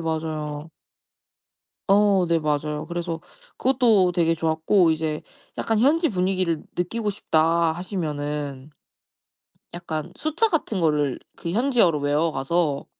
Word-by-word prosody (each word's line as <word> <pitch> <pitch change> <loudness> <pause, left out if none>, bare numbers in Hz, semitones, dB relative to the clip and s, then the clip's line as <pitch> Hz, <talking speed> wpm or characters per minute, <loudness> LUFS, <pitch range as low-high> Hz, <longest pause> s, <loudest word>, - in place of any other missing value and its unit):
맞아요. 155 -1 -4 1.2
어 200 -2 +4
네 170 -1 +3
맞아요. 150 0 -1
그래서 170 -1 -4 0.4
그것도 235 -8 +3
되게 165 -2 +2
좋았고 160 +3 +2
이제 155 -1 -2 0.3
'약간 225 -1 0
현지 315 +8 +3
분위기를 185 - 0
느끼고 210 +5 -1
싶다.' 165 -3 +2
하시면은 150 -6 -4 1.0
약간 160 -3 -5
숫자 315 +9 +1
같은 290 - -1
거를 150 -5 +1 0.2
그 170 - -5
현지어로 230 - +2
외워 150 +3 +1
가서 145 +1 -1
165 Hz, 255 characters per minute, -24 LUFS, 155-195 Hz, 1.2 s, 어